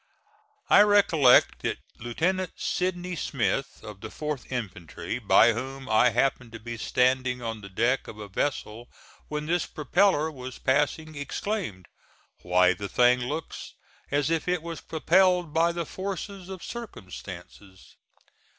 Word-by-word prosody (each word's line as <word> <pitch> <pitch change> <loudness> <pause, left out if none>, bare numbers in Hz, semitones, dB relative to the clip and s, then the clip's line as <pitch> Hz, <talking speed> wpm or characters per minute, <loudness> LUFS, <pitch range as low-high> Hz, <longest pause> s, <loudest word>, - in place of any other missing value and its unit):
I - - +7
recollect 195 -11 +5
that - - -2 0.2
Lieutenant 180 +11 -1
Sidney 180 -1 -2
Smith, 135 -3 -2
of 105 -2 -10
the 110 - -6
4th 150 +2 -5
infantry, 95 -3 -5
by 115 +1 +5
whom 135 +3 -6
I 115 +2 +5
happened 120 0 0
to 115 - -7
be 115 +2 -6
standing 125 +1 +1
on 115 -2 -4
the 100 - -10
deck 120 +7 0
of 105 - -9
a 105 -1 -8
vessel 115 +1 -3 0.4
when 150 0 -4
this 175 +1 0
propeller 160 0 +2
was 130 -3 -8
passing, 150 +3 0
exclaimed, 145 - -4 0.5
"Why, 90 0 +4
the 100 +2 -6
thing 125 0 +4
looks 150 +6 -5 0.3
as 145 +2 +1
if 165 +1 0
it 180 -2 0
was 165 -1 -6
propelled 180 0 +2
by 165 +1 +3
the 170 -1 -3
force 190 +3 -5
of 190 -2 -9
circumstances." 95 - -10
135 Hz, 140 wpm, -27 LUFS, 115-170 Hz, 0.5 s, I